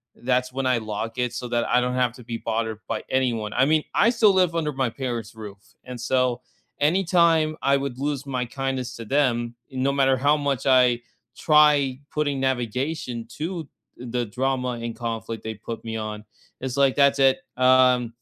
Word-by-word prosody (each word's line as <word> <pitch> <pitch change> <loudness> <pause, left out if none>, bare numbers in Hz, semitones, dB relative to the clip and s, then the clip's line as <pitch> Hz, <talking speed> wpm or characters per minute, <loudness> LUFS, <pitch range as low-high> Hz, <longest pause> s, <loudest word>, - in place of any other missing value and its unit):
that's 125 0 -1
when 135 0 -2
I 125 -2 +3
lock 110 +2 -5
it, 125 -1 -1
so 125 +1 -5
that 120 -1 0
I 125 - +3
don't 125 0 -1
have 125 -2 +1
to 125 -1 -13
be 115 -1 -5
bothered 110 -1 -3
by - - -3
anyone. 115 -5 0
I 130 - +3
mean, 155 +1 +2
I 230 - +4
still 220 -4 +4
live 180 -3 +2
under 155 -2 0
my 130 -2 0
parents' 120 -3 -5
roof. 105 -2 -9 0.3
And 125 -1 -8
so 125 0 0 0.4
anytime 165 -1 +3
I 140 +1 +3
would 135 -2 -4
lose 140 -1 -2
my 130 -3 -2
kindness 130 0 -4
to 115 - -8
them, 120 -3 0 0.2
no 130 +1 0
matter 135 -1 +3
how 145 +3 +3
much 140 -3 -2
I 125 -2 +4 0.4
try 150 -4 +4
putting 145 -3 -1
navigation 125 0 -2
to, 165 -1 -4 0.3
uh, - - -7
the 120 0 -1
drama 125 +1 -2
and 115 -1 -5
conflict 115 -1 -5
they 110 0 -5
put 115 +2 -7
me 115 - -4
on, 105 0 -6 0.4
it's 130 0 -4
like, 135 -2 +3
"That's 140 -1 +4
it. 135 -1 +4 0.2
Uh, 130 -1 +4
130 Hz, 190 wpm, -24 LUFS, 120-140 Hz, 0.4 s, I